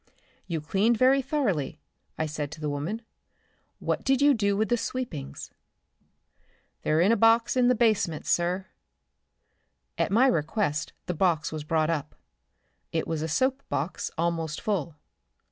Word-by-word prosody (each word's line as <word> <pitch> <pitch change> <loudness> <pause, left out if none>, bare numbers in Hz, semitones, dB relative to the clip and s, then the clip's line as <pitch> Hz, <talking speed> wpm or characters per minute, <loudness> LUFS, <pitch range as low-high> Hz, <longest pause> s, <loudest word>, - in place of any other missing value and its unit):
"You 165 -4 -2
cleaned 200 +9 +2
very 260 +3 +5
thoroughly," 215 - -1 0.4
I 160 - 0
said 150 -1 -4
to 155 - -10
the 150 -1 -2
woman. 170 +11 -3 0.7
"What - - -2
did 270 -1 +2
you 285 0 +6
do 200 -4 +1
with 215 +1 +1
the 240 - +4
sweepings?" 230 - -5 1.3
"They're 155 +2 +2
in 195 +5 +4
a - - +5
box 230 +1 +4
in 250 -1 +4
the 250 - +4
basement, 215 -9 +1
sir." 180 +2 +1 1.3
At - - +2
my 235 +6 +5
request 155 - 0
the 180 - -2
box 165 -3 +1
was 155 -1 -4
brought 155 +1 +1
up. 150 -2 -3 0.8
It 160 - -1
was 160 -2 -2
a 160 - -1
soap 260 - +1
box 150 +6 -2
almost 165 -2 -1
full. 170 -7 -2
180 Hz, 150 wpm, -27 LUFS, 155-230 Hz, 1.3 s, you